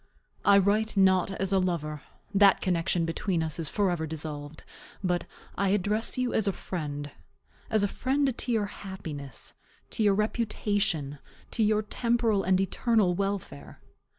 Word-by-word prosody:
I 200 0 +6
write 205 +2 +2
not 190 -1 +4
as 195 0 -1
a 190 - +4
lover, 155 -5 -2 0.3
that 200 -1 +6
connection 175 -1 +1
between 165 +1 -1
us 160 +1 0
is 160 -3 -1
forever 175 -6 0
dissolved, 150 -1 -6 0.4
but 180 -1 0 0.3
I 200 - +1
address 210 +4 +2
you 255 -1 0
as 215 - +1
a - - +3
friend; 145 -6 -5 0.6
as 215 -2 +2
a - - +3
friend 265 +4 0
to 245 - -1
your 220 -3 +2
happiness, 160 - -7 0.4
to - - 0
your 205 -2 +4
reputation, 205 - -1 0.3
to 230 - 0
your 215 0 +3
temporal 230 -1 +1
and 185 0 +2
eternal 195 0 +2
welfare. 195 - -4
195 Hz, 150 wpm, -28 LUFS, 165-210 Hz, 0.6 s, I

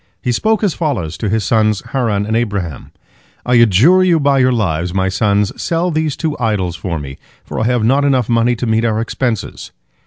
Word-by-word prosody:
He 125 - -2
spoke 220 - 0
as 195 -6 +1
follows 115 - -3
to 110 - -2
his 110 +1 0
sons 110 0 +1
Haran 110 -6 0
and 110 +1 -2
Abraham, 100 - -3 0.5
"I 125 - 0
adjure 115 - +5
you 175 -3 +3
by 140 -1 +2
your 130 0 +3
lives, 90 -6 -1
my 95 0 +1
sons, 100 +1 +1
sell 170 +1 -1
these 155 -2 -1
two 155 -3 -2
idols 100 -7 -1
for 85 -2 -4
me, 70 -3 -8 0.2
for - - -6
I 110 - 0
have 120 -1 +1
not 135 +5 +2
enough 130 -5 +1
money 120 +1 +2
to 120 - -4
meet 110 0 +1
our 110 -2 0
expenses." 115 -1 -3
115 Hz, 205 wpm, -16 LUFS, 100-135 Hz, 0.5 s, adjure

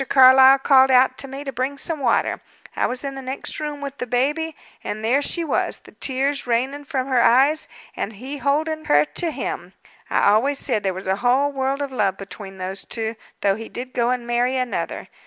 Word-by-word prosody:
Carlyle 265 0 +8
called 265 -1 +5
out 260 0 +5
to 275 - -3
me 275 +2 -7
to 275 - -5
bring 265 +3 -3
some 315 +2 -3
water 245 -4 +1 0.3
I - - +1
was 250 +2 -4
in 275 -1 -4
the 270 - -7
next 260 +1 -5
room 295 -1 -5
with 280 -1 -6
the 250 - -3
baby 295 +6 0 0.3
and 215 +1 -4
there 260 +5 +3
she 340 +4 0
was, 320 - -1
the - - -16
tears 270 +1 -1
raining 265 +5 -1
from 270 -4 -2
her 260 -3 +2
eyes, 275 +7 +4 0.3
and 220 - -4
he 260 +7 -7
holding 310 +4 -1
her 145 +1 +4
to 340 - -2
him. - - -5 0.4
I - - +1
always 270 +7 +2
said 215 - -1
there 190 -2 -1
was 190 - -7
a 190 +1 0
whole 255 +5 +2
world 270 +1 -1
of 280 - -5
love 200 -6 0
between 195 0 -9
those 190 +1 -4
two; 225 -1 -3 0.3
though 200 - +3
he 225 +1 -8
did 255 +1 -7
go 240 -1 +1
and 250 -1 -1
marry 240 +2 +1
another. 255 -2 -3
260 Hz, 210 wpm, -22 LUFS, 235-280 Hz, 0.4 s, Carlyle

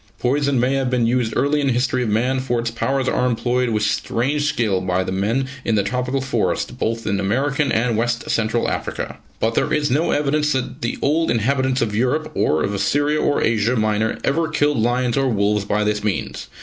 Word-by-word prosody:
Poison 140 +1 +1
may 125 +3 +2
have 135 -2 0
been 125 -2 +1
used 120 -1 +1
early 145 +2 +1
in 140 - 0
the 130 - +2
history 125 +1 0
of 120 - -1
man, 125 +5 +1
for 120 -2 -1
its 115 0 -2
powers 130 +3 -1
are 125 - +1
employed 125 +1 0
with 105 -2 0
strange 125 +8 0
skill 105 -9 0
by 90 0 0
the 95 - -4
men 110 +8 0 0.2
in 115 - +1
the 100 - +2
tropical 125 +3 -1
forest, 135 - -1
both 115 +1 -2
in 100 0 0
American 135 +8 0
and 115 +1 +1
West 120 +2 -1
Central 115 +1 0
Africa. - - -4 0.2
But 115 +1 +1
there - - 0
is 145 -2 +1
no 150 +6 +1
evidence 150 +1 +1
that 130 -1 -3
the 120 - -2
old 160 +3 +2
inhabitants 130 +3 +1
of 105 -3 -3
Europe, 130 +7 0
or 75 0 +1
of 100 - -1
Assyria 145 +9 +1
or 145 - +1
Asia 115 +2 +1
Minor, 110 -1 0
ever 160 +4 +1
killed 150 -4 +1
lions 120 +2 +1
or 135 -1 +2
wolves 105 -3 +1
by 105 +1 0
this 105 0 -1
means. 105 -3 -3
125 Hz, 210 wpm, -20 LUFS, 110-135 Hz, 0.2 s, may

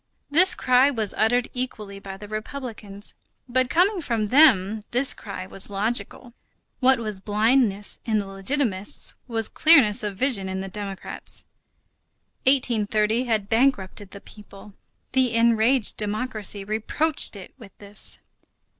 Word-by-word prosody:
This 370 +6 +5
cry 255 +2 +3
was 220 -7 -2
uttered 245 +3 +1
equally 215 -6 -5
by 195 -1 -9
the 205 +1 -11
republicans. 215 -2 -7 0.3
But 255 0 +1
coming 365 +4 +2
from 225 -7 -2
them, 220 -7 +4
this 255 +3 +3
cry 200 -3 -8
was 190 +1 +4
logical. 220 +4 -3 0.5
What 265 0 +4
was 215 -4 -5
blindness 210 0 +1
in 220 -2 0
the 205 - -2
legitimists 195 +1 -2
was 225 -3 +1
clearness 255 -9 +4
of 205 -3 -5
vision 215 -6 +1
in 190 0 -4
the 195 - -5
democrats. 195 -1 -7 1.0
1830 225 -3 +1
had 220 -4 -1
bankrupted 210 -5 0
the 200 0 -11
people. 205 -1 -15 0.4
The 255 -3 +1
enraged 230 +1 +3
democracy 210 -1 -1
reproached 220 +9 0
it 195 -2 -11
with 205 -5 -15
this. 205 0 -4
220 Hz, 130 wpm, -23 LUFS, 200-255 Hz, 1.0 s, This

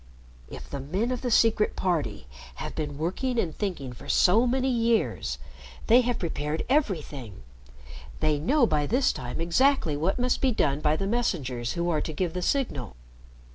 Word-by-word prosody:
"If - - -9
the 140 - -5
men 190 - -2
of 250 - -2
the 250 - -1
Secret 225 -2 +3
Party 145 - -1 0.3
have - - -6
been 145 -2 -4
working 195 - -2
and 165 -9 -1
thinking 170 - -4
for 140 +4 -12
so 220 +7 +4
many 260 +2 +1
years 230 -3 +1 0.5
they 240 +3 +6
have 245 -1 -1
prepared 155 -2 -2
everything. 150 - -1 0.8
They 155 -2 +1
know 255 - +3
by 150 -7 0
this 255 +3 +2
time 125 +3 -6
exactly 170 - +2
what 165 +7 0
must 250 0 0
be 265 - +3
done 145 - +1
by 150 0 +2
the 195 - -2
messengers 145 - -1
who 170 0 -1
are 155 -2 +1
to 160 - -4
give 170 +1 -2
the 180 - -3
signal. 175 - -1
180 Hz, 175 wpm, -27 LUFS, 145-240 Hz, 0.8 s, they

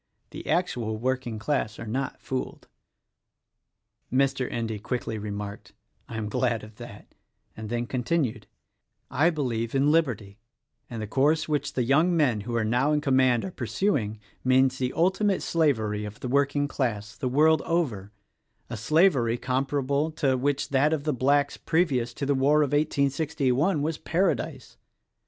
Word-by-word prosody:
The - - -9
actual 120 -11 0
working 125 -1 -2
class 110 -2 -1
are 115 - -7
not 130 +5 -3
fooled." 130 -1 -5 1.4
Mr. 135 0 +1
Endy 110 -2 -3
quickly 110 0 -3
remarked, 105 -1 -6 0.4
"I 115 - -5
am 110 -1 -3
glad 120 -1 0
of 110 0 -13
that;" - - -11 0.4
and 110 -1 -7
then 120 +1 -1
continued, 130 +1 -1 0.6
"I 160 +6 +3
believe 120 -7 -2
in 140 +2 +3
Liberty; 115 -11 0 0.5
and 115 -2 -5
the - - -5
course 145 +7 +2
which 145 -2 -1
the 125 - 0
young 155 +8 +3
men 125 -9 +2
who 120 +3 -4
are 115 -2 +1
now 125 +6 +2
in 150 - +2
command 130 -4 +2
are 190 - -5
pur 120 -8 -5
suing, 115 - 0 0.3
means 130 0 +3
the 125 -1 0
ultimate 190 +3 +1
slavery 110 -11 +1
of 105 0 -8
the - - -5
working 140 +2 +1
class, 115 -5 -3
the 130 - -2
world 155 +4 +4
over: 125 - -1 0.6
a 115 - -4
slavery 135 - +3
compared 135 +2 -1 0.3
to 135 -2 +2
which 140 +2 -1
that 140 +3 +3
of 150 -3 -1
the 150 0 0
Blacks 140 +3 +2
previous 140 -8 0
to 140 - -3
the 140 - +2
war 145 +3 +3
of 145 - -1
1861 145 +1 +1
was 155 0 -2
paradise. 185 +3 -1
130 Hz, 155 wpm, -26 LUFS, 115-150 Hz, 1.4 s, world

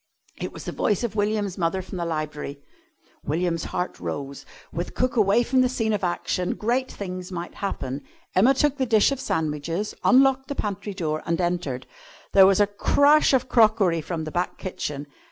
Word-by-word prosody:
It - - -4
was - - -9
the - - -3
voice 210 +1 0
of 230 -3 -2
William's 205 -2 -1
mother 175 +2 0
from 185 0 -7
the 170 - -1
library. 155 -3 -4 0.6
William's 165 +2 -1
heart 180 +1 -3
rose. 140 -1 -5 0.3
With 170 +2 -4
cook 255 0 0
away 215 +1 +4
from 260 +2 +2
the 255 - +3
scene 225 -3 0
of 205 -2 -2
action 180 0 -1
great 245 +4 -1
things 185 -1 -6
might 175 -1 -5
happen. 140 -9 -4 0.3
Emma 240 +9 +5
took 290 +1 +2
the 260 -2 0
dish 220 +2 +4
of 275 - -2
sandwiches, 165 - -2
unlocked 265 +1 +4
the 285 - -4
pantry 200 -2 -4
door, 155 -4 -2
and 170 +1 0
entered. 175 -8 -2 0.5
There 190 -1 +8
was 195 0 +4
a 205 - +6
crash 285 +9 +4
of 260 -2 +2
crockery 215 -8 +4
from 160 0 -4
the 155 - -5
back 175 +2 -2
kitchen. 150 -6 -5
190 Hz, 185 wpm, -24 LUFS, 165-230 Hz, 0.6 s, There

